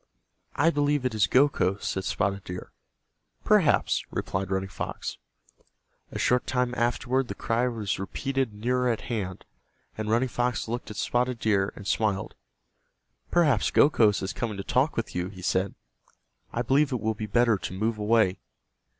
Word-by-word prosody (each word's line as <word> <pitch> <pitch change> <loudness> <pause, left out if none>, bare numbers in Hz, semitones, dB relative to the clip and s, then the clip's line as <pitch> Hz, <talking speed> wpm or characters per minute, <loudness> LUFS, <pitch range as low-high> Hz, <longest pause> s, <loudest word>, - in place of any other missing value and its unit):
"I 160 +4 +4
believe 145 -3 +1
it 125 - 0
is 105 -2 +3
Gokhos," 125 -8 +2
said 95 0 -2
Spotted 100 0 -1
Deer. 90 0 -7 0.7
"Perhaps," - - +3
replied 95 0 -3
Running 95 0 -1
Fox. 95 - -5 0.9
A - - -6
short 125 0 +2
time 125 -1 0
afterward 125 +2 0
the - - -5
cry 115 +2 0
was 110 -6 -2
repeated 135 +5 -2
nearer 125 +4 0
at 115 - -1
hand, 100 -6 -4 0.5
and 110 0 -4
Running 120 +4 +2
Fox 120 -1 -1
looked 120 +1 -4
at 105 - -8
Spotted 125 0 0
Deer 100 -3 +1
and 100 - -10
smiled. 105 -2 0 1.0
"Perhaps 150 -11 +3
Gokhos 110 -10 +4
is 95 - -3
coming 110 -4 -3
to 100 - -4
talk 135 +8 +1
with 115 - -2
you," 90 0 -2
he 95 -2 -11
said. 95 +1 0 0.8
"I 120 - -1
believe 135 +4 +3
it 125 - -1
will 110 +1 0
be 105 0 -5
better 115 -1 +3
to - - -5
move 105 +4 -1
away." 105 -3 +2
115 Hz, 160 wpm, -27 LUFS, 100-125 Hz, 1.0 s, I